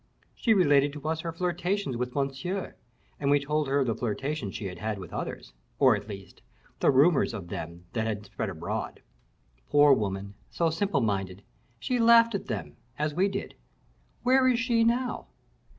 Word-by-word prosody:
She 225 -2 +2
related 145 -6 +4
to 150 0 -7
us 160 0 -1
her 165 +1 -4
flirtations 180 -1 -1
with 125 +1 -3
Monsieur, 140 +8 -2 0.5
and 140 - 0
we 145 0 +5
told 150 +1 -1
her 140 +1 +2
of - - +1
the 115 - 0
flirtations 125 +1 -3
she 105 - -5
had 90 -2 -6
had 110 0 -2
with 90 -4 -9
others, - - -5 0.2
or, 130 -5 +5
at 105 0 -7
least, 95 -2 -10 0.4
the - - +3
rumors 140 -2 +4
of 90 -5 -7
them 85 +2 -7
that 115 -1 -1
had 105 -1 -3
spread 100 +1 -4
abroad. 85 -2 -5 0.7
Poor 145 -1 +6
woman, 100 -3 -2 0.2
so 165 -1 0
simple 165 -3 0
minded! 95 -3 -2 0.3
she 245 - -1
laughed 230 0 +6
at 200 - -3
them, 100 - -5 0.2
as 150 0 -1
we 185 +5 +2
did. 200 0 -4 0.7
Where 260 +1 +4
is 250 -2 +3
she 240 -2 +2
now?" 245 +2 0
140 Hz, 180 wpm, -28 LUFS, -, 0.7 s, Poor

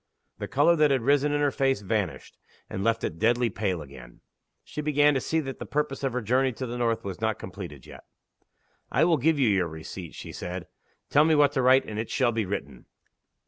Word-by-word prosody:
The - - -4
color 150 +5 +4
that 150 -1 +4
had 135 -4 +1
risen 145 +2 +3
in 145 0 0
her 145 -1 +2
face 135 -4 +1
vanished, 100 -3 -3 0.4
and 95 - -3
left 115 +1 +1
it 80 - -3
deadly 120 +1 +2
pale 95 -5 -2
again. 65 -4 -14 0.4
She 150 - -6
began 150 0 +3
to 135 - 0
see 160 - 0
that 135 -2 -7
the - - -5
purpose 150 -2 -2
of 135 - 0
her 125 -1 -2
journey 130 +4 +2
to 130 - -5
the 120 0 -5
north 115 -2 0
was 95 -2 -6
not - - 0
completed - - -9
yet. - - -12 0.9
"I 150 - +3
will 170 -2 +3
give 155 +3 +2
you 135 -4 +3
your 95 -4 +2
receipt," 80 +2 -8
she - - -8
said. 90 0 -6 0.5
"Tell 145 - +6
me 160 0 +4
what 145 -1 +5
to 135 -2 0
write, 130 +1 +5
and 105 0 -5
it 115 - -4
shall 130 -3 +2
be 110 -3 -2
written." 70 -10 -6
125 Hz, 225 wpm, -27 LUFS, 100-145 Hz, 0.9 s, Tell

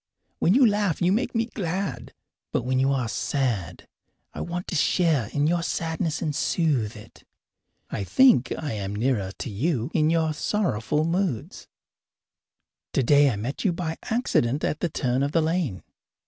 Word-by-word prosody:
When 180 - +3
you 265 -1 +6
laugh 205 -6 +1
you 175 +1 +2
make 235 +5 0
me 225 0 +2
glad, 180 - -4 0.4
but - - 0
when 130 0 +1
you 135 +1 +3
are 130 -4 0
sad 115 - -2 0.5
I - - -6
want 175 +1 -4
to - - -3
share 155 - +2
in 145 0 +1
your 170 +2 +2
sadness 165 -1 -2
and 150 -3 -2
soothe 135 -12 0
it. 105 0 -15 0.7
I 100 - -2
think 245 - +4
I 150 -6 -4
am 100 -1 -4
nearer 105 -4 0
to - - -5
you 130 - -1
in 155 -2 +3
your 160 -1 +1
sorrowful 150 - 0
moods. 170 - -2 1.3
Today 140 +2 +4
I 120 - -1
met 115 +7 -4
you 190 - +2
by 165 -2 -3
accident 150 - 0
at 150 - -1
the 175 - -1
turn 130 -3 -1
of 140 +1 -1
the 165 - +3
lane. 160 - -1
150 Hz, 165 wpm, -25 LUFS, 125-175 Hz, 1.3 s, you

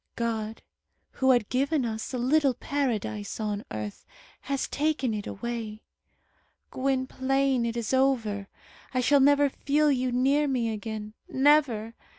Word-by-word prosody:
God, 225 -2 -3 0.5
who 265 - +1
had 240 -5 +4
given 275 +1 +1
us 220 -1 -4
a 255 - -2
little 265 +2 +2
Paradise 225 -8 -2
on 210 -1 -2
earth, 105 -1 -6 0.5
has 275 -1 0
taken 285 -5 0
it 210 -1 -4
away. 225 -1 -5 0.9
Gwynplaine, 265 -1 0
it 230 0 -3
is 235 +1 -2
over. 230 -7 +1 0.5
I - - +3
shall 285 +3 +4
never 285 +1 +5
feel 290 +2 +1
you 255 -2 0
near 275 +4 +2
me 240 -4 0
again. 215 0 -6 0.2
Never! 265 -6 +3
250 Hz, 135 wpm, -27 LUFS, 220-275 Hz, 0.9 s, never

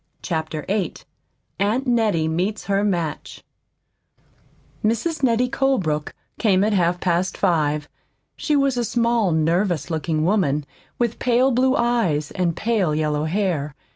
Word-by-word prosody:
CHAPTER 160 -3 -3
VIII 200 -2 -1 0.6
AUNT 215 +7 +1
NETTIE 220 -10 +1
MEETS 180 +7 -1
HER 200 0 0
MATCH 170 -7 -3 1.4
Mrs. 235 +10 0
Nettie 250 -1 +2
Colebrook 190 - 0 0.2
came 195 -4 +3
at 215 +1 +1
half 175 -2 +1
past 180 +1 0
five. 150 -5 +1 0.5
She 300 - 0
was 275 -3 +2
a 240 - +1
small, 235 -4 +1
nervous 165 +1 0
looking 160 -1 -1
woman 150 -7 +1 0.3
with 235 -2 -1
pale 250 +2 +3
blue 260 +2 +2
eyes 230 - +1
and 175 -3 -1
pale 205 -9 0
yellow 150 -1 0
hair. 160 -5 -1
190 Hz, 130 wpm, -22 LUFS, 160-235 Hz, 1.4 s, came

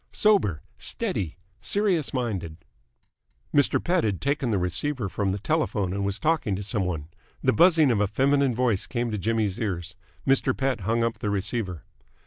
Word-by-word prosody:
Sober, 190 - +2 0.2
steady, 85 -3 -1 0.2
serious 195 -8 +1
minded!" 100 -11 -3 1.0
Mr. 145 -1 +4
Pett 180 +1 +1
had 100 -4 0
taken 140 -2 0
the 105 - +1
receiver 100 - -1
from 100 0 -1
the 95 - -1
telephone 105 - 0
and 100 0 -2
was 100 0 -1
talking 155 -10 +1
to 100 - -4
some 100 -1 -1
one. 80 -5 -3 0.4
The - - +3
buzzing 160 - +5
of 110 - +1
a 105 - +2
feminine 135 +3 +2
voice 115 -5 +1
came 120 -1 -2
to 105 - -2
Jimmy's 110 -2 0
ears. 90 -5 -3 0.3
Mr. 135 -1 +3
Pett 135 -3 0
hung 115 +4 0
up 115 0 -1
the 105 - -2
receiver. 100 - -2
110 Hz, 170 wpm, -26 LUFS, 95-135 Hz, 1.0 s, buzzing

